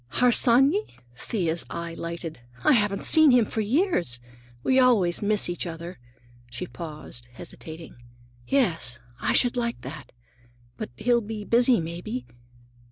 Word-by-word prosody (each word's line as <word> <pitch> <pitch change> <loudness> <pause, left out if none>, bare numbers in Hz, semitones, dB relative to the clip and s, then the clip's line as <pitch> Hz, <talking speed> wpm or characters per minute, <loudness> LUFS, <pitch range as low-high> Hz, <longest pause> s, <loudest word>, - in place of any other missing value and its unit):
"Harsanyi?" 260 - +4 0.2
Thea's 170 - -2
eye 170 0 -5
lighted. 170 -3 -6 0.2
"I - - +5
haven't 205 -6 +2
seen 315 -2 +6
him 245 -3 +5
for 220 - -3
years. 215 - +1 0.4
We 260 0 +3
always 215 -9 +3
miss 210 0 +2
each 175 0 -3
other." 170 -1 -8 0.5
She 120 0 -5
paused, 150 -3 -8
hesitating. 160 +5 -9 0.5
"Yes, 170 - +1 0.2
I - - 0
should 245 0 +3
like 235 -1 -2
that. - - -9 0.6
But - - -6
he'll 240 0 +2
be 215 -1 -6
busy, 240 +1 +4
maybe?" 165 -6 -5
205 Hz, 130 wpm, -25 LUFS, 165-245 Hz, 0.6 s, seen